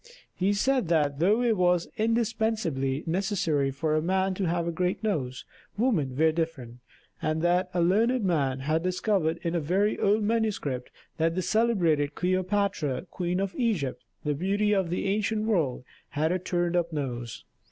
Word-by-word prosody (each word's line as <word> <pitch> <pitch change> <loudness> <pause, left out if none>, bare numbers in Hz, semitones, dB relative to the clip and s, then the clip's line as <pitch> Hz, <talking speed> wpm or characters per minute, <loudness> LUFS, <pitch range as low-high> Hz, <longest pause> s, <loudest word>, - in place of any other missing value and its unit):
He 190 +2 +1
said 255 +1 +1
that 150 -4 +1
though 210 +8 +3
it 235 -2 +3
was 180 -2 +2
indispensably 220 - 0
necessary 165 -5 0
for 150 +3 -1
a 155 - +2
man 190 +3 +1
to 190 +1 -2
have 170 0 0
a - - 0
great 180 +5 -1
nose, 135 - -2 0.3
women 170 - +1
were 160 +1 +4
different; 150 -8 -4 0.4
and 155 +1 -1
that 180 +1 +2
a 175 -2 +1
learned 225 +7 +2
man 140 -7 0
had 155 +4 0
discovered 185 -2 0
in 170 - -1
a 170 - +1
very 190 +7 +1
old 210 +2 +2
manuscript 205 - -1 0.3
that 165 +1 +1
the 185 - -1
celebrated 170 -10 +2
Cleopatra, 185 -5 0
Queen 180 0 -2
of 195 -1 -2
Egypt, 160 - -1 0.2
the 150 - 0
beauty 200 +7 +1
of 190 -4 +1
the 180 - -2
ancient 215 +2 0
world, 160 - 0 0.3
had 155 +3 0
a 185 - 0
turned 175 -1 -1
up 170 -1 +1
nose. 125 -6 -4
175 Hz, 165 wpm, -27 LUFS, 155-205 Hz, 0.4 s, were